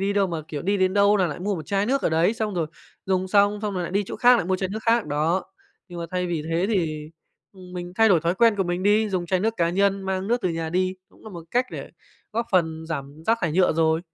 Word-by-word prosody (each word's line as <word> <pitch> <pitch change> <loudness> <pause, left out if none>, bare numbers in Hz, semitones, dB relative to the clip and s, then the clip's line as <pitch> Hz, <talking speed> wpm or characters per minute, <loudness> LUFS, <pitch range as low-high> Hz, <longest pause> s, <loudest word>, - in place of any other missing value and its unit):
đi 200 +1 0
đâu 200 -1 +2
mà, 170 -3 -4
kiểu, 150 -3 -5
đi 200 +3 +1
đến 185 0 +1
đâu 200 +1 +5
nà 185 - +2
lại 155 - -5
mua 200 +2 -1
một 155 - -7
chai 200 0 0
nước 275 +3 +1
ở - - +2
đấy, 165 +7 +2
xong 215 -3 -3
rồi 165 -3 0 0.4
dùng 190 0 0
xong 205 +1 +3
xong 205 -2 -2
rồi 180 - -2
lại 175 - -5
đi 200 +1 +2
chỗ - - -6
khác 240 -5 +4
mua 190 - +1
chai 190 0 -2
nước 215 +3 -5
khác 230 0 +2
đó. 155 +5 0 0.4
Nhưng 175 - -8
mà 170 - -4
thay 180 0 -1
vì 170 -3 -2
thế 170 +4 +1
thì, 155 -7 -1 0.4
ừm, 185 -2 -13
mình 175 0 -6
thay 225 +1 +5
đổi 175 -4 +4
thói 170 +3 0
quen 225 +2 +4
của 195 - +2
mình 175 +1 -2
đi, 210 +2 +3
dùng 180 -2 -2
chai 185 +1 +1
nước 220 +3 0
cá 170 -1 +1
nhân 195 +1 +1
mang 190 0 -2
nước 240 +1 +1
từ 185 - +1
nhà 165 -1 -3
đi 185 +2 0
cũng - - -22
nà 220 - -9
một 170 -3 -9
cách 250 +1 +1
để - - -7 0.4
góp 230 +2 -1
phần 160 -3 +1
giảm 145 -1 -6
rác 230 +1 +3
thải 165 -3 0
nhựa 185 0 +3
rồi. 160 0 +2
185 Hz, 285 wpm, -24 LUFS, 170-205 Hz, 0.4 s, đâu